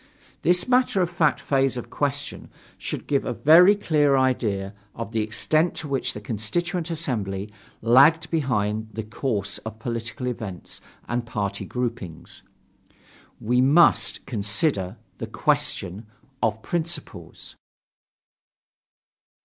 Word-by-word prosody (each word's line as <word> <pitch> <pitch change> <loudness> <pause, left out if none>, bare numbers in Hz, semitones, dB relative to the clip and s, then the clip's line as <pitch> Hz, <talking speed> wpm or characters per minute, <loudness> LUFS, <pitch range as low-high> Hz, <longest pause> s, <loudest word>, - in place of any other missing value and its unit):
This 180 - +2
matter 250 -6 +3
of 175 - -3
fact 165 -4 +2
phase 135 -2 +1
of 120 - -3
the - - -20
question 145 0 -2 0.3
should - - -5
give 140 -1 +1
a 125 - -3
very 175 - +7
clear 150 -8 +2
idea 110 -7 0 0.2
of 115 -2 -6
the 115 -1 0
extent 155 - +1
to 155 - -5
which 135 -2 -1
the - - -5
Constituent 160 - -2
Assembly 105 - -3 0.3
lagged 150 +7 +5
behind 110 -8 0
the 110 - -4
course 105 -2 -3
of 110 0 -8
political 115 +2 -5
events 110 -7 -6 0.3
and 120 0 -1
party 100 -3 -3
groupings. 120 -9 -5 1.0
We 125 +3 +2
must 150 +6 +4
consider 105 - 0 0.2
the - - -4
question 100 +5 -1 0.3
of 110 0 0
principles. 165 - -4
125 Hz, 120 wpm, -24 LUFS, 105-155 Hz, 1.0 s, very